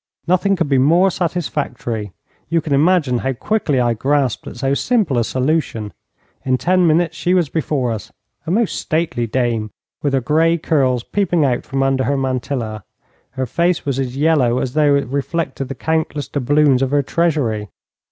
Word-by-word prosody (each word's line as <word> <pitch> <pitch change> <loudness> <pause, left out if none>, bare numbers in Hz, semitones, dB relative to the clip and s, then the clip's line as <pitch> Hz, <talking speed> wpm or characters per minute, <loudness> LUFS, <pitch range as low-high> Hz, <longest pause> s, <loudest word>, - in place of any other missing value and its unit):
Nothing 185 +3 +2
could 170 -4 -1
be 135 -2 +2
more 170 +8 +4
satisfactory. 140 - -3 0.4
You 165 0 +2
can 155 -2 -3
imagine 145 -4 +3
how 135 +2 -1
quickly 150 - 0
I 120 -1 +2
grasped 135 +2 0
at - - -8
so 135 +2 0
simple 195 - +1
a - - +2
solution. 130 -5 -1 0.5
In 130 -1 +1
ten 180 +4 +2
minutes 165 +1 +2
she 180 +1 +1
was 175 -6 +2
before 145 -6 -1
us, 110 -3 -6 0.4
a - - -2
most 215 +4 +1
stately 155 -8 -1
dame, 115 -2 -1 0.3
with 145 -2 -1
her 135 - +3
grey 160 +6 +2
curls 130 -7 +1
peeping 175 -5 +1
out 125 -3 0
from 135 0 -1
under 135 -1 +1
her 140 +3 0
mantilla. 125 -5 -3 0.5
Her 130 -1 -2
face 170 +7 0
was 135 -2 -1
as 130 -1 -3
yellow 140 -5 +2
as 130 -1 -2
though 150 -1 +3
it 140 - +1
reflected 140 +1 -3
the 135 - -6
countless 160 0 -2
doubloons 145 0 +2
of 135 - +1
her 145 +1 +2
treasury. 135 -11 0
140 Hz, 175 wpm, -18 LUFS, 125-165 Hz, 0.5 s, more